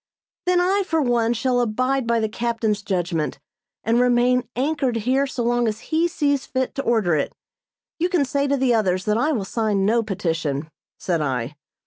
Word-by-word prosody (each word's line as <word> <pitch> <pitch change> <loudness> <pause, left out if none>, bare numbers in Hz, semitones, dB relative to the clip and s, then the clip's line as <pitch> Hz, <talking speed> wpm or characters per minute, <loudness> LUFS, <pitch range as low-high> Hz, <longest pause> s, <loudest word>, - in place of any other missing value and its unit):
"Then 360 0 +4
I, 380 +3 +2
for 325 -4 0
one, 240 -4 +2
shall 245 +1 +1
abide 255 +3 0
by 235 0 +2
the 220 - 0
captain's 225 -2 -1
judgment, 175 -6 -2 0.5
and 230 +2 +2
remain 250 -1 +3
anchored 270 -1 0
here 255 +5 +1
so 255 -2 -3
long 240 0 +1
as 220 +6 -5
he 330 +2 +3
sees 285 -4 0
fit 260 -1 -2
to 275 - -2
order 220 -10 +2
it. 145 - -2 0.6
You 350 +2 +1
can 350 -6 +2
say 280 +1 0
to 280 0 +1
the 260 -2 +2
others 190 -4 +1
that 210 +1 +1
I 300 +6 +2
will 220 -10 -1
sign 210 -2 0
no 230 +3 +3
petition," 165 -8 -2 0.3
said 170 -4 -1
I. 130 -2 -2
235 Hz, 185 wpm, -22 LUFS, 205-270 Hz, 0.6 s, Then